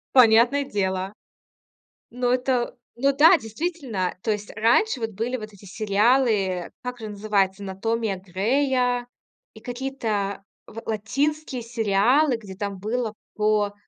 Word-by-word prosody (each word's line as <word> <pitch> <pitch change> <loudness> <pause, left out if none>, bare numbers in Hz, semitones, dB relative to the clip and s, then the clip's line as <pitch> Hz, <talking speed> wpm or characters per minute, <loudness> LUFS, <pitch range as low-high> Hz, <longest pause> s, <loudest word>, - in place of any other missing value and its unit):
Понятное 245 +4 +6
дело. 190 -3 -2 1.0
Ну 245 0 0
это 250 -1 0 0.2
ну 275 +3 +2
да, 325 +5 +8
действительно. 230 - -3
То - - -1
есть 205 0 -5
раньше 240 - +3
вот 225 -1 -2
были 230 +5 -2
вот 215 -3 -8
эти 200 0 -16
сериалы, 220 +6 +2
э, 185 -4 -1
как 250 0 -5
же 220 - -6
называется, 200 -1 0
"Анатомия 210 +2 -2
Грея" 245 +6 0 0.5
и - - -13
какие-то 230 -6 -3 0.2
ла 225 +1 -9
латинские 265 +5 -1
сериалы, 235 +5 +2
где 205 -4 -10
там 200 -1 -4
было 220 +2 -2 0.2
по 210 -1 +1
225 Hz, 130 wpm, -24 LUFS, 200-250 Hz, 1.0 s, да